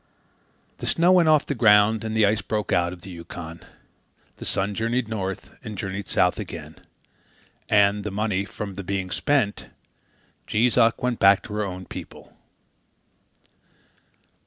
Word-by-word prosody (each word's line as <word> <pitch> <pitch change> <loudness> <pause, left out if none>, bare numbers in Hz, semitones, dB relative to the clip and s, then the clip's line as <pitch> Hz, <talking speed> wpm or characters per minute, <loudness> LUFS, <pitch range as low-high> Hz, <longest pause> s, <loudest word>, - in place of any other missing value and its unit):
The - - -5
snow 170 +2 +3
went 175 -3 +5
off 155 -2 +4
the - - -2
ground 110 -2 +4
and 110 0 -3
the 110 - +5
ice 105 +2 +1
broke 105 -1 -2
out 85 -1 +2
of 90 -1 -10
the 95 - -10
Yukon. 85 -1 -9 0.8
The - - -8
sun 100 +1 0
journeyed 115 +3 -1
north, 95 -4 -4
and 110 -4 -7
journeyed 95 0 -4
south - - +2
again; - - -8 0.9
and, 100 -1 +3
the 105 - -3
money 100 -1 -1
from 100 0 -6
the 100 +1 -7
being 95 0 -3
spent, 125 - 0 0.8
Jees 115 +3 +2
Uck 115 +1 +3
went 125 -2 0
back 100 0 +5
to 105 - -8
her 105 0 -1
own 95 -2 -6
people. - - -10
105 Hz, 155 wpm, -24 LUFS, 95-110 Hz, 0.9 s, went